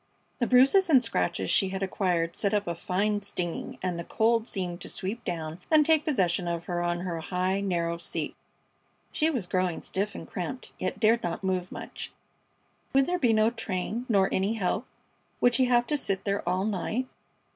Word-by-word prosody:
The 240 - +1
bruises 275 +10 +5
and 265 -5 +6
scratches 90 - -1
she 195 - +4
had 190 +1 -3
acquired 175 -3 0
set 205 0 +1
up 205 0 +1
a 170 - -2
fine 205 +4 0
stinging, 180 -4 -4
and 180 -2 -1
the - - -3
cold 230 +4 +2
seemed 180 -2 -3
to - - -6
sweep 215 +6 -4
down 165 -2 -4
and 310 -2 +6
take 315 0 +3
possession 185 - +1
of 170 -1 -2
her 175 -1 -2
on 175 0 -1
her 175 -2 -3
high, 185 +3 -1
narrow 170 -3 -1
seat. 170 - -2 0.8
She 315 - +2
was 250 - -2
growing 185 -1 -1
stiff 200 +2 -2
and - - -7
cramped, 250 +8 -5
yet 185 - -2
dared 230 +1 +4
not 175 +2 -3
move 185 -1 -1
much. - - -7 0.8
Would 270 0 +5
there 360 +3 -1
be 245 -6 +4
no 220 +1 +4
train, 225 +1 -3
nor 195 -3 +4
any 195 +3 +1
help? 220 +3 -1 0.5
Would 245 - +4
she 260 +1 +3
have 245 -1 +3
to 295 - 0
sit 195 -8 -2
there 200 0 0
all 185 +2 +1
night? 220 +5 -1
195 Hz, 190 wpm, -28 LUFS, 180-235 Hz, 0.8 s, and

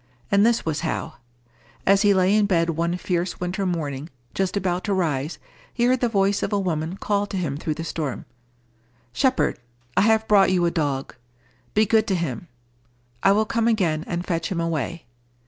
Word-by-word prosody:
And 200 0 +5
this 235 +1 +2
was 155 -2 -1
how: 160 -1 -3 0.7
as 195 0 +5
he 205 -1 +5
lay 190 0 +3
in 210 -1 +3
bed 170 -3 +2
one 170 +2 -1
fierce 180 0 -2
winter 185 +2 -2
morning, 150 -4 -3 0.2
just 190 +1 -1
about 180 -2 -1
to 200 -2 0
rise, 155 -4 -1 0.3
he 235 - -1
heard 255 +1 +3
the 240 - +1
voice 200 -2 +1
of - - -2
a 205 - +1
woman 170 -1 -2
call 205 0 0
to 195 - -4
him 160 -7 -2
through 155 +1 -3
the 165 - -5
storm, 155 -5 -4 0.9
"Shepherd, 260 - +1 0.4
I - - +4
have 220 +1 +3
brought 200 -2 +5
you 180 -2 +2
a 170 - +2
dog. 145 -5 -2 0.6
Be 215 - +5
good 220 +1 +3
to 195 - +1
him. 170 -2 -3 0.7
I 195 - +5
will 215 +2 +2
come 230 +1 0
again 175 -9 +1
and 175 +1 -3
fetch 165 0 -2
him 175 - -1
away." 165 -1 -2
180 Hz, 190 wpm, -23 LUFS, 165-205 Hz, 0.9 s, And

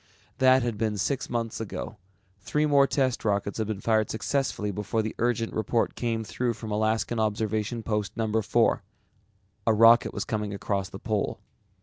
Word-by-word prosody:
That 130 -1 +5
had 115 -4 -2
been 110 -2 0
six 135 +7 -1
months 115 -2 -2
ago. 110 0 -6 0.4
Three 150 +10 0
more 140 -2 +5
test 130 -3 0
rockets 100 0 -1
had 110 - -1
been 105 -2 -4
fired 110 -2 +2
successfully 110 -2 -1
before 105 +3 -1
the 110 - -3
urgent 115 -1 0
report 110 +2 0
came 115 -2 -2
through 120 +2 -2
from 110 0 -7
Alaskan 110 +2 0
Observation 110 +1 -1
Post 105 -4 -2
No. 110 -1 +1
4. - - +2 0.9
A 110 - +5
rocket 115 +2 +6
was - - -4
coming 105 -2 -2
across 100 -1 -2
the - - -8
Pole. 105 0 -2
110 Hz, 165 wpm, -27 LUFS, 105-120 Hz, 0.9 s, rocket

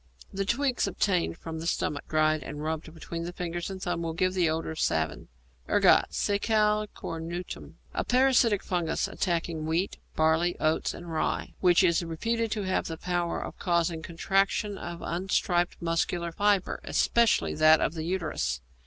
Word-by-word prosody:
The 195 0 -1
twigs 255 +3 +1
obtained 180 -4 0
from 160 -1 -6
the 165 - -4
stomach, 145 -4 -1
dried 155 0 +2
and 150 +3 -6
rubbed 160 +1 -3
between 165 +1 -6
the 175 - -4
finger 175 -1 -4
and 190 -1 -6
thumb, 175 -2 -2
will 165 -1 -2
give 185 +2 +1
the 180 -3 +2
odour 160 +1 -2
of 160 - -7
savin. 80 -1 0 0.4
=Ergot= - - +5
(Secale 210 +1 +1
Cornutum). 165 +2 -6 0.2
A - - -1
parasitic 250 -5 +3
fungus 175 -3 -1
attacking 165 -3 -2
wheat, 170 +5 0 0.2
barley, 160 +2 +2
oats, 155 +1 +1
and 170 -1 -8
rye, 160 - -1
which 180 0 +5
is 170 -1 +3
reputed 230 +8 -1
to 210 -1 -2
have 185 0 0
the 165 - -5
power 175 0 -1
of - - -9
causing 170 -2 +1
contraction 195 +5 0
of 170 -2 -7
unstriped 175 0 0
muscular 170 0 -1
fibre, 205 +1 +1
especially 235 -2 +2
that 155 0 +6
of - - 0
the 160 - -4
uterus. 165 - -2
175 Hz, 160 wpm, -28 LUFS, 160-195 Hz, 0.4 s, that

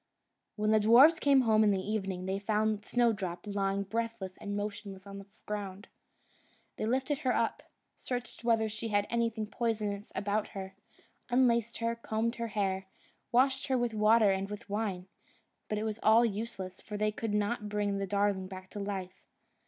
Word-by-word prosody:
When 215 0 +1
the 220 - +5
dwarfs 250 +10 +7
came 275 -2 +5
home 220 -3 +4
in 210 - +4
the 195 -2 +2
evening, 190 -2 -3
they 190 +1 -1
found 215 0 0
Snowdrop 205 -7 0
lying 200 -1 -1
breathless 220 -2 -3
and 205 0 -4
motionless 200 -2 -5
on 200 0 -8
the 195 - -12 0.2
ground. 205 -1 -5 0.9
They 215 - -2
lifted 265 +4 0
her 260 -4 +1
up, 230 -1 0 0.3
searched 245 -1 -5
whether 225 -2 +3
she 215 +1 -4
had 205 -2 +1
anything 230 -2 0
poisonous 210 -3 -2
about 205 +2 0
her, 190 0 -6 0.6
unlaced 235 -2 +2
her, 230 0 -1
combed 230 +1 -2
her 235 0 -2
hair, 190 -1 0 0.4
washed 265 +3 +3
her 260 -2 +2
with 240 -2 0
water 215 0 +5
and 195 +1 -1
with 210 -1 -7
wine; 200 -4 -2 0.6
but 210 - -1 0.2
all 220 +2 +6
was 235 - +3
useless, 195 -3 -6
for 210 - -6
they 215 0 +1
could 210 0 -3
not 210 0 -1
bring 205 -1 -1
the 195 - -2
darling 200 -1 +1
back 185 0 -10
to 205 - -6
life. 190 -2 -5
210 Hz, 170 wpm, -31 LUFS, 200-230 Hz, 0.9 s, dwarfs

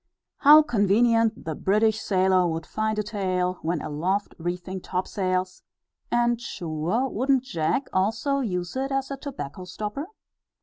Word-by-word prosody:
How 300 +2 +8
convenient 230 0 +2
the 160 - -2
British 215 +6 +2
sailor 185 -2 +2
would 165 -1 -3
find 215 0 -2
a 210 - 0
tail, 185 -3 -1
when 165 0 -1
aloft 185 +7 -1
reefing 180 +2 -4
topsails; 185 0 -2 0.5
and, 240 0 +1
sure, 175 +5 -2
wouldn't 260 +2 +1
Jack 255 - -1
also 225 +9 +1
use 180 -7 -3
it 270 +1 -2
as 270 0 -1
a 275 - -3
tobacco 185 - -7
stopper? 210 - -5
200 Hz, 135 wpm, -25 LUFS, 180-240 Hz, 0.5 s, How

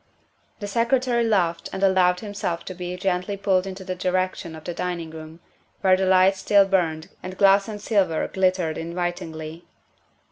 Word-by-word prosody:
The 205 - -5
Secretary 235 +2 +1
laughed 180 -7 0
and 190 - -4
allowed 185 -2 +3
himself 205 -5 -4
to 185 - -6
be 180 0 -6
gently 185 +1 -1
pulled 190 -1 +1
in 190 - -5
the 190 -1 -5
direction 185 -2 -2
of 155 - -11
the 175 - -4
dining 170 -2 -4
room, 160 +1 -10 0.4
where 190 -1 +5
the 190 0 0
lights 190 +1 +4
still 200 0 +4
burned 165 -5 0
and 185 0 -7
glass 195 +1 +5
and 210 -2 -6
silver 195 -7 +1
glittered 185 -4 0
in 170 +1 -6
vitingly. 165 -2 -4
185 Hz, 170 wpm, -24 LUFS, 170-195 Hz, 0.4 s, where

